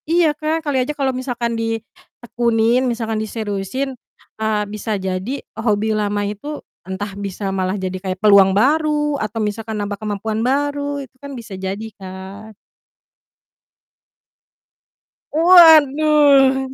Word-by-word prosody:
Iya, 330 -2 +3
Kak, 315 +2 -2
kali 275 -3 +1
aja 260 +4 -2
kalau 270 -2 0
misalkan 245 -2 -3
ditekunin, 230 +1 -1
misalkan 225 -2 -2
diseriusin, 220 +4 -3 0.5
eee, 215 -1 0
bisa 215 0 -3
jadi 190 +5 -3
e - - -14
hobi 215 -1 +1
lama 205 -1 -1
itu 250 +9 -5 0.2
entah 190 +2 -6
bisa 195 0 -4
malah 190 +1 -1
jadi 185 -1 -4
kayak 185 0 -3
peluang 195 -1 +5
baru 295 +3 +1
atau 215 +1 -4
misalkan 220 0 -3
nambah 205 0 -4
kemampuan 215 +1 -3
baru 285 +3 -1
itu 260 - -27
kan 280 0 -8
bisa 230 -4 -9
jadi, 190 +3 -5
Kak. 195 +3 -10 2.8
Waduh! 300 -5 +6
225 Hz, 120 wpm, -19 LUFS, 205-275 Hz, 2.8 s, Waduh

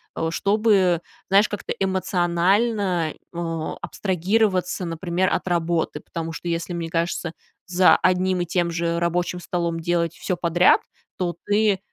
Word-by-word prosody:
э, 160 - -1
чтобы, 195 -2 +2 0.3
знаешь, 200 +2 +5
как-то 205 - -5
эмоционально, 185 0 +1
э, 170 - -16 0.4
абстрагироваться, 185 -1 0
например, 175 +2 -1
от - - -1
работы, 170 -1 0
потому 165 0 -5
что, 175 - -7
если, 170 +1 -2
мне 170 -1 -4
кажется, 170 0 -2 0.3
за 180 0 +5
одним 185 0 +1
и - - -1
тем 170 0 0
же 170 0 -1
рабочим 175 +1 -1
столом 170 -1 -2
делать 170 0 0
всё 185 - -2
подряд, 175 +1 +4 0.4
то 175 -2 -2
ты 205 -1 +2
175 Hz, 135 wpm, -23 LUFS, 170-190 Hz, 0.4 s, знаешь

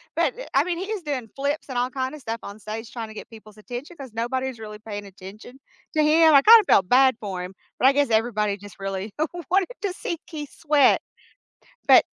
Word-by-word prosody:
but, - - +1 0.2
I - - +5
mean, 350 -2 -2
he 380 - -3
is 405 -6 -4
doing 260 -7 -4
flips 285 +2 -2
and 250 - -4
all 250 +1 +1
kinda 265 +3 -4
stuff 230 -3 -5
on 200 +2 -9
stage 220 +2 -7
trying 230 -2 -5
to - - -10
get - - -9
people's 215 -2 -15
attention 245 +9 -8
'cause 265 -4 -9
nobody's 255 +1 -3
really 210 -1 -9
paying 205 -2 -7
attention 200 +7 -12 0.4
to 305 - +4
him. 315 +1 +5
I 275 - +8
kinda 445 +1 +8
felt 190 -2 +4
bad 260 -1 +5
for 190 -3 -4
him, 185 +1 -8 0.3
but 260 - +5
I 275 - +6
guess 285 -2 +2
everybody 215 -2 +1
just 205 -1 -13
really 195 +1 -4 0.4
wanted 385 +3 +3
to 380 -3 -1
see 340 -2 -4
Keith 295 -3 -7
sweat. 295 -4 +4 0.9
But - - +8
245 Hz, 210 wpm, -24 LUFS, 215-290 Hz, 0.9 s, I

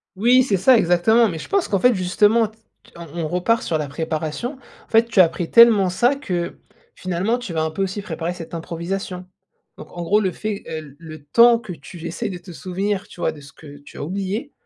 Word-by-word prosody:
Oui, 245 +6 +4
c'est 210 -7 +1
ça, 235 +7 +5
exactement. 220 +6 +3
Mais 165 -5 -5
je - - -9
pense 395 -3 +1
qu'en 195 - 0
fait, 250 +5 +4
justement, 210 +5 +3
t 220 +1 -21 0.4
on 170 0 -9 0.2
on - - -1
repart 180 +8 0
sur 160 - -1
la 150 - -3
préparation. 160 - -4 0.3
En - - -35
fait, 225 +1 +4
tu 230 -4 -1
appris 170 0 0
tellement 225 -5 +6
ça 240 +9 +2
que, 180 -11 -4 0.4
finalement, 185 +7 -2
tu 240 -6 -7
vas 160 -1 0
un 160 - -2
peu 160 - -4
aussi 195 +2 -3
préparer 165 -1 -4
cette 170 -2 -10
improvisation. 180 +3 -5 0.5
Donc, - - -12
en 175 - -3
gros, 205 +5 +3
le 190 -3 0
fait, 215 +1 -5
heu, 160 - -4
l 140 -3 -14
le 155 -2 -11
temps 235 +10 +5
que 220 -5 -8
tu 170 0 -11
essaies 220 +5 -4
de 185 - -6
te 175 +1 -13
souvenir, 190 +3 -3
tu 175 - -12
vois, - - +1
de 150 - -13
ce 140 0 -14
que 145 -2 -13
tu 145 - -15
as - - -5
oublié, 195 - -4
185 Hz, 230 wpm, -21 LUFS, 170-220 Hz, 0.5 s, tellement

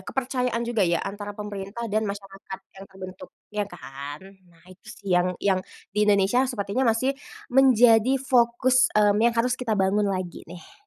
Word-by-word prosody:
kepercayaan 250 -3 -1
juga 230 -3 0
ya, 170 -2 +2
antara 205 +1 -5
pemerintah 205 +2 -6
dan 215 +1 +2
masyarakat 195 -1 -8 0.2
yang 195 0 -11
terbentuk 185 -1 -10 0.3
ya 210 -1 0
kan. 140 -1 -8 0.3
Nah, 165 0 -24
itu 185 - -23
sih 200 - -10
yang 180 +1 +3
yang 190 -2 +1 0.3
di - - -2
Indonesia 200 +5 +3
sepertinya 220 +1 -2
masih 255 +5 0 0.4
menjadi 245 -2 +5
fokus, 255 0 +3
mmm, 210 -1 +4
yang 235 0 +3
harus 245 +2 +2
kita 250 -3 -3
bangun 200 +2 +2
lagi 185 -2 -4
nih. 180 - -14
205 Hz, 160 wpm, -25 LUFS, 190-245 Hz, 0.4 s, menjadi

